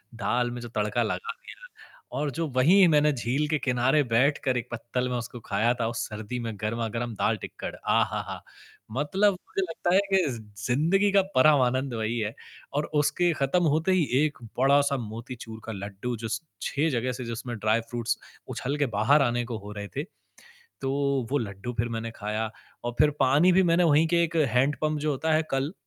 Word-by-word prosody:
दाल 120 +3 0
में 120 - -5
जो 120 - -6
तड़का 105 +3 +1
लगा 455 - -3
दिया, - - -13 0.5
और 145 -1 -1
जो 165 +4 -2
वहीं 180 +8 +6
मैंने 150 -2 +4
झील 130 +4 -1
के 155 - +2
किनारे 130 +3 +2
बैठकर 130 +1 +2
एक 120 0 -4
पत्तल 125 +2 -2
में 125 - -2
उसको 120 +1 -6
ख़ाया 110 +4 +2
था 115 - +1
उस 115 -1 -3
सर्दी 110 +3 -5
में 115 -2 -4
गरमा-गरम 115 +1 -2
दाल, - - +1
टिक्कड़ - - -7
आहाहा! - - 0 0.5
मतलब 150 - +2
मुझे 190 +1 -5
लगता 175 -1 -1
है - - +7
कि - - +7
ज़ 120 - -6 0.3
ज़िंदगी 170 +11 +2
का 200 0 +5
परम 145 +1 +6
आनंद 130 +1 0
वही 115 +1 -1
है, 110 +1 -3 0.4
और 145 +1 0 0.2
उसके 175 +3 +2
ख़त्म 155 +7 +2
होते 160 +4 +1
ही 185 -3 +3 0.2
एक 150 -2 -3 0.2
बड़ा-सा 140 +1 +4
मोतीचूर 115 0 -7
का 115 - -5
लड्डू 100 +4 -5
जो 115 +1 -5
स 110 0 -2 0.2
6 150 +3 0
जगह 125 0 0
से 125 0 -6
जिसमें 120 +1 -5
ड्राई 110 +2 +2
फ्रूट्स 120 -1 -1 0.3
उछल 140 +3 -3
के 145 - +2
बाहर 140 +8 +5
आने 120 -1 +1
को 115 -2 -4
हो 105 0 -9
रहे 105 0 -6
थे। 140 - 0 0.8
तो 135 - -1 0.4
वो 145 - +2
लड्डू 100 0 -5
फ़िर 120 +1 -1
मैंने 115 0 -3
ख़ाया 110 +1 -3 0.4
और 120 - -2
फ़िर 150 -1 +5
पानी 145 +7 +5
भी 190 +2 +5
मैंने 170 +1 +4
वहीं 155 0 +5
के 170 0 +3
एक 170 0 -3
हैंड 130 +5 +2
पंप 155 -1 +1
जो 155 +1 0
होता 160 +3 0
है 155 - +3
कल 135 +4 -1
125 Hz, 195 wpm, -27 LUFS, 115-150 Hz, 0.8 s, है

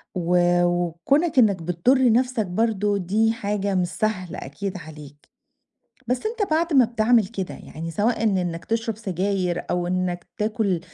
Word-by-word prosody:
و 180 0 +1 0.3
وكونك 175 - +1
إنك 200 -7 +4
بتضر 235 +10 +3
نفسك 250 -2 +1
برضه 205 +1 0
دي 210 +5 +1
حاجة 200 -2 -2
مش 180 -1 +1
سهلة 185 -2 -2
أكيد 185 +8 -5
عليك 150 -3 -12 0.8
بس 250 +1 0
أنت 435 -5 -2
بعد 330 +1 +1
ما 260 -3 +6
بتعمل 225 -2 +2
كده، 195 -4 -5
يعني 165 +2 -8
سواءً 220 +7 0
إن 200 -4 +2
إنك 170 -2 -3
تشرب 225 -1 -2
سجاير 185 -3 -2
أو 175 0 0
إنك 180 -1 -2
تاكل 210 -5 0
200 Hz, 150 wpm, -23 LUFS, 175-230 Hz, 0.8 s, ما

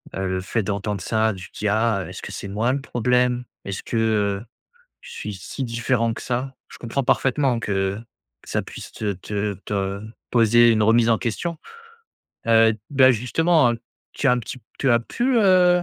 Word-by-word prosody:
heu, 95 - -2
le 95 0 -1
fait 110 +4 -1
d'entendre 100 0 -3
ça, 110 +3 +1
tu 90 -1 -10
te - - -14
dis: 105 - -1
«Ah, 110 -1 +1
heu, - - -9
est-ce 90 - -8
que - - -7
c'est - - -6
moi 110 +5 0
le 135 - 0
problème? 125 -1 +1 0.2
Est-ce 100 0 -5
que, 115 - -3
heu, 105 -2 +1 0.6
je - - -13
suis 105 - -6
si 95 +8 -6
différent 115 0 0
que - - -8
ça?» 130 +2 -3
je - - -12
comprends 120 +4 -2
parfaitement 130 0 +2
que, 100 -2 -1 0.5
ça - - -2
puisse - - -10
te 105 -2 -2
te 105 +2 -3
te 100 -1 -2 0.3
poser 120 0 +5
une 110 -1 +3
remise 115 +1 +4
en 115 - +3
question, 165 +9 -3 0.9
heu, 115 -1 +5 0.2
bah, 130 -2 +6
justement, 130 +4 +3
heu, 115 - -5 0.3
tu 140 - 0
as - - +6
un 125 - +2
petit 125 +2 -7 0.2
tu 135 - +2
as 120 0 +4
pu, 245 - -1
heu, 180 -3 +5
115 Hz, 195 wpm, -23 LUFS, 105-125 Hz, 0.9 s, bah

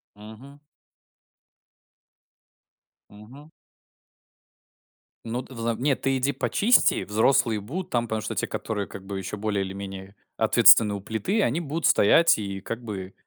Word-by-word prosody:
Мгм. 110 +7 -13 2.5
Мгм. 125 +9 -15 1.8
Ну, 120 +2 -3
ты 130 - -14
взам 115 0 -3
нет, 140 -1 0
ты 135 0 0
иди 135 +2 0
почисти, 220 - +2
взрослые 110 +2 +1
будут 170 - -6
там. 120 -6 -1
Потому 110 -1 -3
что - - -5
те, - - -2
которые 105 -3 -4
как 95 - -11
бы 100 0 -6
ещё 95 +2 -6
более 105 -1 -2
или 95 - -6
менее 95 0 -9 0.2
ответственны 105 -2 +6
у 100 - -5
плиты, 110 - -2
они 140 +2 0
будут 155 0 -4
стоять 165 +11 +4
и 100 -2 -6
как 115 +5 -6
бы 95 -4 -7
110 Hz, 140 wpm, -24 LUFS, 100-135 Hz, 2.5 s, ответственны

